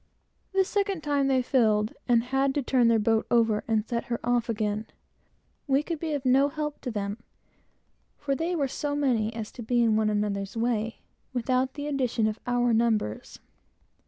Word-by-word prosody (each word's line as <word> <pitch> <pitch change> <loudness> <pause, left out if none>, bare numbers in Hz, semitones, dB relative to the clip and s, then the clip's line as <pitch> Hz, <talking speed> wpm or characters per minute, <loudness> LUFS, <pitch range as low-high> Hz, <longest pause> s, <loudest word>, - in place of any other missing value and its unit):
The 385 -1 +3
second 395 -3 -1
time, 285 -2 +1
they 260 -2 +2
filled, 220 -5 +2
and 235 -1 +4
had 270 +2 0
to 285 - 0
turn 245 -1 +3
their 230 -1 +4
boat 220 +1 +1
over, 225 -3 +2
and 220 -2 +1
set 235 -2 -2
her 235 -1 -3
off 240 -1 +1
again. 215 -1 -1 0.8
We 275 +1 +2
could 330 -1 -4
be 315 -1 -2
of 280 -2 -3
no 265 +2 +5
help 300 0 -4
to 255 - -4
them, 205 -1 -3 1.0
for 285 -1 -2
they 330 +5 -1
were 285 -4 +1
so 285 +2 -3
many 240 -7 +1
as 220 -2 -5
to - - -9
be 240 +1 +1
in 225 -2 +3
one 215 0 +2
another's 205 -1 -2
way, 225 -1 -1 0.3
without 255 +2 0
the 290 -1 -5
addition 255 -6 0
of 215 0 -1
our 245 -1 +2
numbers. 220 - 0
245 Hz, 185 wpm, -27 LUFS, 220-275 Hz, 1.0 s, no